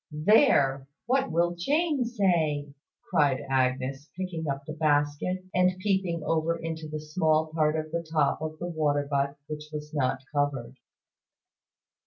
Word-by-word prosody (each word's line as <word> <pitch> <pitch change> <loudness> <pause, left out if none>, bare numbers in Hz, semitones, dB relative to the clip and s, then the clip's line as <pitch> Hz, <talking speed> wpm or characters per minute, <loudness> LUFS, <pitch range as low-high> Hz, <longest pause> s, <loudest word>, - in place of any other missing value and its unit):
"There! 150 - +4 0.2
What 265 +3 +1
will 170 +1 +2
Jane 290 - +1
say?" 165 -11 0 0.4
cried 140 -3 +2
Agnes, 130 +2 0
picking 175 -4 -4
up 140 0 -3
the 155 - -6
basket, 150 +4 0
and 180 0 +3
peeping 185 -4 0
over 165 +1 +1
into 160 -1 -5
the 155 0 -5
small 155 0 +1
part 155 -1 +2
of 155 0 -3
the 170 +1 -1
top 150 -2 +2
of 155 0 -4
the 175 - -5
water 150 -4 0
butt 140 0 0
which 150 0 -6
was 150 0 -7
not 135 -2 0
covered. 135 -4 -1
155 Hz, 145 wpm, -27 LUFS, 145-175 Hz, 0.4 s, There